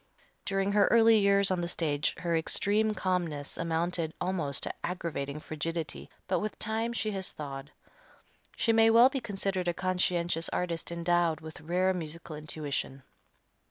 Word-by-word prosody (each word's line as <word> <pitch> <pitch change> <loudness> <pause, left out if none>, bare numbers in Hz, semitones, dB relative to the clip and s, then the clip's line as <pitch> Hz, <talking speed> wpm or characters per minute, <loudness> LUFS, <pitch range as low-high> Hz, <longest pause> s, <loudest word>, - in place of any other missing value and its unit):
During 195 0 0
her 205 0 +4
early 225 -1 +6
years 200 -1 +3
on 180 -1 0
the 170 - -1
stage 150 -4 0
her 170 -1 -1
extreme 210 +6 +2
calmness 170 -7 -2
amounted 165 0 -1
almost 165 -7 -1
to - - 0
aggravating 150 -5 -3
frigidity, 155 +1 -4 0.2
but 185 - +1
with 215 - -4
time 225 +1 -1
she 215 -2 -1
has 190 -2 -4
thawed. 140 -1 -7 0.9
She 230 - +2
may 225 0 +6
well 235 +3 +7
be 270 - -2
considered 195 -3 -2
a 175 - 0
conscientious 175 -2 0
artist 170 -2 -2
endowed 170 -2 +1
with 160 0 -10
rare 180 +4 +1
musical 165 -2 -6
intuition. 150 -3 -4
175 Hz, 150 wpm, -30 LUFS, 160-200 Hz, 0.9 s, well